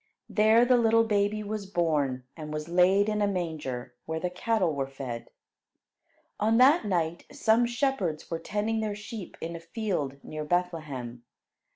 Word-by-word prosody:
There 220 +3 +5
the 250 0 +5
little 230 -1 +4
baby 210 -1 +1
was 210 -1 -4
born, 150 -8 0
and 155 -2 -7
was 155 0 -4
laid 185 +4 +4
in 210 -1 0
a 205 - +3
manger, 150 -10 -3
where 160 0 -2
the 180 +1 -2
cattle 185 -2 +1
were 135 -1 -2
fed. 125 -4 -6 1.1
On 220 +2 +3
that 275 +6 +6
night, 170 -4 -1
some 230 +2 +3
shepherds 240 - -1
were 165 - -1
tending 210 +5 -1
their 215 -2 -2
sheep 210 -2 -8
in 170 +1 -4
a - - -6
field 165 - -3
near 155 0 -5
Bethlehem. 150 -8 -2
180 Hz, 160 wpm, -28 LUFS, 155-215 Hz, 1.1 s, that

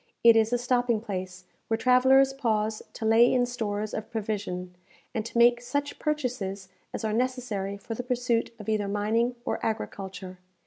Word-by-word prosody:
It 230 -1 +8
is 225 0 +3
a 245 - +3
stopping 245 -2 +1
place, 185 -4 -6 0.2
where 225 - +1
travellers 260 +3 +5
pause 220 -5 0
to 225 - -5
lay 225 +2 +6
in 250 -1 +3
stores 215 -3 -3
of 215 - -5
provision, 205 -5 -4 0.4
and 220 - -1
to 235 - -5
make 240 0 +5
such 285 +4 -3
purchases 240 -11 -2 0.2
as - - -5
are 215 - 0
necessary 230 -5 -2
for 200 +3 -6
the 225 - -3
pursuit 245 -2 0
of 210 - -10
either 215 -2 0
mining 220 +4 0
or - - -2
agriculture. 190 -4 -4
225 Hz, 170 wpm, -27 LUFS, 205-245 Hz, 0.4 s, It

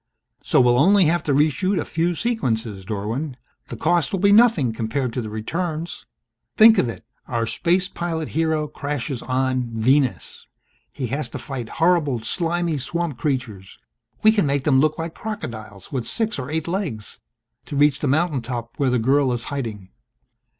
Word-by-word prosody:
"... - - -40
so - - +3
we'll 125 -1 +4
only 195 +4 +5
have 170 +3 +2
to 145 - -2
reshoot 155 +7 +2
a - - -2
few 170 +2 0
sequences, 115 - -2
Dorwin. 115 +8 -3 0.3
The - - -7
cost 170 -2 +1
will 195 - -1
be 200 +2 +4
nothing 205 - +5
compared 115 +3 -2
to 125 - -2
the 110 - -6
returns. 160 +10 -4 0.5
Think 220 -2 +8
of 125 - +1
it! 115 - -8 0.2
Our 115 -2 -1
space 180 +9 +1
pilot 165 -4 -4
hero 160 -1 0
crashes 145 -3 -4
on 130 -1 -1
Venus. 130 +3 0 0.4
He 135 - -4
has 150 +2 -2
to - - -6
fight 130 -6 -6
horrible 165 -7 +2
slimy 170 +3 -1
swamp 160 0 -3
creatures 115 -10 -3 0.5
we 215 - +7
can 205 -8 +1
make 140 -1 0
them 135 -2 +4
look 155 +2 +2
like 165 0 -4
crocodiles 110 - -7
with 130 -4 -3
six 220 -7 -2
or 130 0 -5
eight 160 +1 -2
legs 165 - -4 0.5
to - - -5
reach 145 0 +3
the 145 - -1
mountaintop 130 -6 -1
where 140 -2 +2
the 125 - +2
girl 135 +3 +2
is 120 -1 -2
hiding 110 -9 -5
145 Hz, 170 wpm, -22 LUFS, 120-170 Hz, 0.5 s, Think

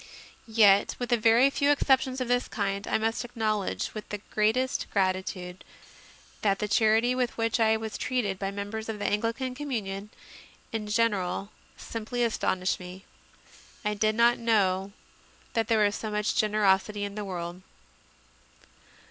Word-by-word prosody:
Yet, 210 -3 +5
with 245 0 -4
a - - +6
very 235 +4 +4
few 280 +1 +1
exceptions 265 -2 +2
of 255 - -2
this 245 0 +1
kind, 200 -1 -2
I - - +2
must 225 +2 -1
acknowledge 220 -4 -2
with 215 -1 -8
the 210 - -3
greatest 225 +5 +1
gratitude 185 -2 -2 0.8
that 200 -2 +2
the 210 - -2
charity 220 +3 +3
with 250 -2 -1
which 230 +1 0
I 220 -1 +4
was 220 -1 -6
treated 210 -7 -1
by 195 - -2
members 205 +3 -5
of 220 - -3
the 205 - -4
Anglican 230 +5 -1
communion 210 -8 -4 0.6
in 220 -2 -3
general 210 -3 0 0.3
simply 230 +2 -3
as 230 -2 0
tonished 185 0 0
me. 180 +1 -10 0.8
I 210 - +1
did 215 +1 +1
not 235 +1 +4
know 200 -4 +1 0.6
that 225 -2 0
there 220 -2 +3
was 205 0 0
so 220 - -4
much 210 0 0
generosity 210 -1 +2
in 200 0 -4
the 210 0 -4
world. 175 -2 -5
215 Hz, 155 wpm, -28 LUFS, 200-230 Hz, 0.8 s, a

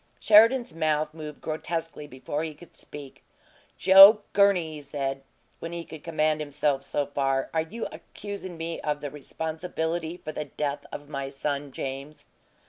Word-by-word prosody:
Sheridan's 225 0 +5
mouth 155 -1 0
moved 155 -2 -9
grotesquely 160 -1 -4
before 145 +3 -4
he 155 -2 -5
could 170 +2 -16
speak. 145 -2 -11 0.5
"Joe 195 +3 +9
Gurney," 195 -6 +3
he 150 - -8
said, 135 -1 -3 0.4
when 165 +1 -6
he 170 -1 -5
could 155 -2 -11
command 155 -2 +1
himself 145 -2 0
so 145 +1 -2
far, 135 -1 -1
"are 160 - +2
you 215 +9 -5
accusin' 200 -4 -8
me 165 +1 -4
of 150 -1 -2
the 145 - -5
responsibility 160 +3 -4
for 155 - -7
the 150 - -4
death 145 0 -4
of 145 - -8
my 140 -2 -4
son 140 0 -3
James?" 135 +3 -6
155 Hz, 155 wpm, -26 LUFS, 145-165 Hz, 0.5 s, Joe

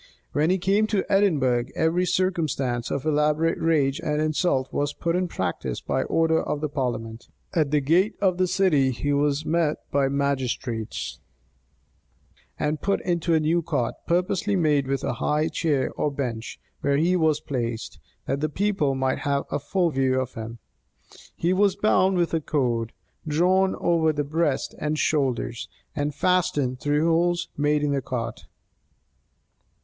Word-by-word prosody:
When 150 +3 +1
he 185 - +3
came 200 +4 +2
to 205 -3 0
Edinburgh, 140 -12 +3
every 175 +3 +1
circumstance 155 -10 0
of 140 - -3
elaborate 150 +2 +1
rage 150 -3 +2
and 150 -3 -1
insult 155 -3 0
was 145 0 -1
put 170 0 -1
in 180 0 0
practice 65 - -3
by - - -1
order 160 0 +2
of 150 - -2
the 155 0 -2
parliament. 120 -4 -4 0.2
At 155 -4 +2
the 150 0 +2
gate 175 +9 +2
of 185 -3 +1
the 185 - +3
city 180 -8 +3
he 145 +3 -1
was 145 +1 +1
met 160 -2 +1
by 140 -1 +2
the - - 0
magistrates, 130 -5 -2 1.4
and 150 0 -1
put 200 0 +1
into 170 -1 0
a - - +4
new 160 +3 +1
cart, 145 -8 -1
purposely 185 +4 +1
made 150 -6 +2
with 135 -1 -1
a - - -1
high 150 +2 +1
chair 150 -4 0
or 150 - -1
bench, 125 -5 -4 0.2
where 140 0 +1
he 170 +5 +2
wus 160 -4 +2
placed, 120 -7 -4 0.3
that 135 +1 -1
the 155 - 0
people 185 -5 0
might 130 0 0
have 140 -2 0
a - - 0
full 175 +4 0
view 130 -2 +1
of 130 -1 -3
him. 115 +1 -7 0.8
He 175 +2 +1
was 200 0 +3
bound 190 -3 +3
with 170 -1 0
a 165 - +1
cord, 120 -6 -1 0.4
drawn 185 +5 +2
over 165 -2 +2
his 145 -1 -2
breast 155 -1 0
and 155 0 -1
shoulders, 130 -6 -1 0.3
and 145 -1 -2
fastened 145 -8 +1
through 145 +2 +1
holes 175 +1 +1
made 150 +1 +1
in 145 - +1
the 140 -1 0
cart. 115 -3 -5
150 Hz, 165 wpm, -25 LUFS, 135-170 Hz, 1.4 s, a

